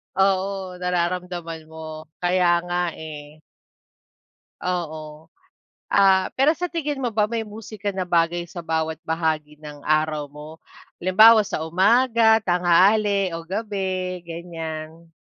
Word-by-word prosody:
Oo, 190 Hz, -1 st, 0 dB
nararamdaman 175 Hz, -2 st, -3 dB
mo. 160 Hz, 0 st, -9 dB, 0.2 s
Kaya 175 Hz, -1 st, +2 dB
nga, 175 Hz, -1 st, -2 dB
eh. 150 Hz, -1 st, -10 dB, 1.2 s
Oo. 160 Hz, -3 st, -4 dB, 0.6 s
Ah, 190 Hz, -1 st, +5 dB
pero 275 Hz, +3 st, +4 dB
sa 355 Hz, -, -2 dB
tingin 300 Hz, -4 st, -3 dB
mo 245 Hz, -4 st, -2 dB
ba 210 Hz, -1 st, +1 dB
may 225 Hz, -1 st, -2 dB
musika 210 Hz, -1 st, -6 dB
na 190 Hz, -, -3 dB
bagay 175 Hz, -1 st, +1 dB
sa 170 Hz, -1 st, -8 dB
bawat 160 Hz, -1 st, -1 dB
bahagi 160 Hz, -2 st, -1 dB
ng 150 Hz, -1 st, -9 dB
araw 155 Hz, -1 st, +1 dB
mo? 150 Hz, +2 st, -11 dB, 0.4 s
Halimbawa, 215 Hz, +4 st, +6 dB
sa 200 Hz, -6 st, -3 dB
umaga, 225 Hz, +6 st, +4 dB
tanghali 195 Hz, +2 st, +3 dB
o 165 Hz, 0 st, -6 dB
gabi, 190 Hz, -2 st, -3 dB
ganyan? 165 Hz, -1 st, -7 dB
175 Hz, 120 wpm, -23 LUFS, 160-200 Hz, 1.2 s, Halimbawa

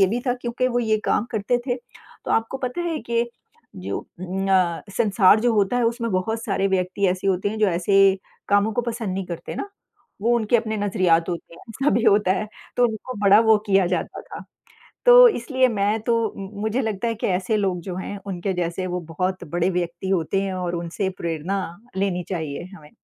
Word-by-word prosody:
ये 195 Hz, -, +7 dB
भी 230 Hz, +6 st, -1 dB
था 245 Hz, -, +2 dB
क्योंकि 245 Hz, +1 st, 0 dB
वो 245 Hz, -1 st, 0 dB
ये 220 Hz, -2 st, +1 dB
काम 210 Hz, -, +1 dB
करते 220 Hz, +3 st, +1 dB
थे, 245 Hz, -2 st, 0 dB
तो 245 Hz, 0 st, -13 dB
आपको 225 Hz, +4 st, 0 dB
पता 255 Hz, +5 st, -3 dB
है 330 Hz, -3 st, -2 dB
कि 235 Hz, 0 st, +1 dB, 0.5 s
जो -, -, -4 dB
अ, 185 Hz, -1 st, -1 dB
संसार 210 Hz, -2 st, +4 dB
जो 240 Hz, +1 st, +2 dB
होता 205 Hz, +3 st, +2 dB
है 245 Hz, -, +2 dB
उसमें 230 Hz, 0 st, -1 dB
बहुत 220 Hz, +5 st, -1 dB
सारे 195 Hz, -2 st, 0 dB
व्यक्ति 190 Hz, +1 st, 0 dB
ऐसे 185 Hz, +1 st, -2 dB
होते 190 Hz, +1 st, +1 dB
हैं 220 Hz, -, -5 dB
जो 215 Hz, -, +4 dB
ऐसे 195 Hz, +2 st, +4 dB, 0.3 s
कामों 205 Hz, +2 st, +3 dB
को 245 Hz, -, 0 dB
पसंद 230 Hz, -5 st, -3 dB
नहीं 195 Hz, 0 st, -3 dB
करते 170 Hz, -2 st, -6 dB
ना। -, -, -4 dB, 0.5 s
वो 240 Hz, +1 st, +3 dB
उनके 225 Hz, +1 st, +2 dB
अपने 220 Hz, -1 st, -2 dB
नज़रियात 185 Hz, -5 st, +2 dB
होते 170 Hz, -1 st, -5 dB
हैं -, -, -15 dB
ऐसा 270 Hz, +6 st, 0 dB
भी 235 Hz, -, +2 dB
होता 205 Hz, -3 st, +4 dB
है 215 Hz, +2 st, -2 dB, 0.3 s
तो 245 Hz, -, +4 dB
उनको 225 Hz, +3 st, -6 dB
बड़ा 205 Hz, +1 st, +6 dB
वो 220 Hz, -1 st, +5 dB
किया 195 Hz, -2 st, +4 dB
जाता 180 Hz, -, -2 dB
था। -, -, -10 dB, 0.6 s
तो -, -, +10 dB
इसलिए 260 Hz, -, +1 dB
मैं 210 Hz, -1 st, 0 dB
तो 235 Hz, +1 st, +1 dB, 0.2 s
मु 195 Hz, -1 st, -6 dB
मुझे 220 Hz, +4 st, 0 dB
लगता 220 Hz, 0 st, -2 dB
है 230 Hz, -, -1 dB
कि 220 Hz, -, -3 dB
ऐसे 190 Hz, +3 st, 0 dB
लोग 190 Hz, -4 st, 0 dB
जो 185 Hz, -1 st, -5 dB
हैं 200 Hz, +2 st, -5 dB
उनके 190 Hz, 0 st, -2 dB
जैसे 180 Hz, +1 st, -2 dB
वो 180 Hz, 0 st, -2 dB
बहुत 185 Hz, +2 st, -2 dB
बड़े 175 Hz, +1 st, +2 dB
व्यक्ति 175 Hz, 0 st, -3 dB
होते 190 Hz, +1 st, +1 dB
हैं 195 Hz, -1 st, -2 dB
और 180 Hz, -1 st, -3 dB
उनसे 170 Hz, +3 st, -2 dB
प्रेरणा 170 Hz, +4 st, -2 dB, 0.4 s
लेनी 190 Hz, -2 st, 0 dB
चाहिए 160 Hz, -6 st, -3 dB
हमें। 150 Hz, -4 st, -14 dB
200 Hz, 205 wpm, -23 LUFS, 185-230 Hz, 0.6 s, तो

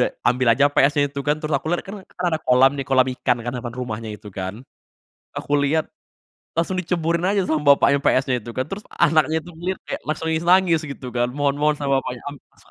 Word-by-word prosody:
udah -, -, +4 dB, 0.2 s
ambil 125 Hz, 0 st, +1 dB
aja 145 Hz, +5 st, +3 dB
PS-nya 145 Hz, +1 st, +4 dB
itu, 140 Hz, -, -4 dB
kan. 150 Hz, -, +2 dB
Terus 155 Hz, 0 st, -4 dB
aku 145 Hz, -, -7 dB
liat, 175 Hz, -, 0 dB
kan 195 Hz, -, -7 dB, 0.2 s
kan, 180 Hz, -, -4 dB
ada 160 Hz, -, 0 dB
kolam 130 Hz, +2 st, +5 dB
nih, 135 Hz, -, -3 dB
kolam 130 Hz, -1 st, +4 dB
ikan, 125 Hz, -1 st, +1 dB
kan, 120 Hz, -, -3 dB
depan 120 Hz, -1 st, -5 dB
rumahnya 115 Hz, -2 st, -5 dB
itu, 105 Hz, -, -12 dB
kan. 95 Hz, +1 st, -3 dB, 0.8 s
Aku 145 Hz, -, -5 dB
liat, 155 Hz, +2 st, +1 dB, 0.7 s
langsung 170 Hz, +3 st, 0 dB
diceburin 170 Hz, 0 st, -1 dB
aja 200 Hz, +1 st, +2 dB
sama 155 Hz, -1 st, +1 dB
bapaknya 140 Hz, 0 st, +3 dB
PS-nya 130 Hz, 0 st, +2 dB
itu, 120 Hz, -, -7 dB
kan. 130 Hz, -, 0 dB
Terus, 200 Hz, +2 st, -6 dB, 0.2 s
anaknya 155 Hz, +1 st, +3 dB
itu 175 Hz, -, -12 dB
ngeliat 185 Hz, +3 st, -3 dB
kayak -, -, -4 dB
langsung 155 Hz, +1 st, -3 dB
nangis-nangis 170 Hz, 0 st, +3 dB
gitu 135 Hz, -2 st, -8 dB
kan. 120 Hz, 0 st, +1 dB
Mohon-mohon 145 Hz, +1 st, +1 dB
sama 140 Hz, -1 st, -1 dB
bapaknya, 125 Hz, -2 st, -5 dB
am 145 Hz, -, -8 dB, 0.2 s
a -, -, -33 dB
145 Hz, 215 wpm, -22 LUFS, 130-165 Hz, 0.8 s, kolam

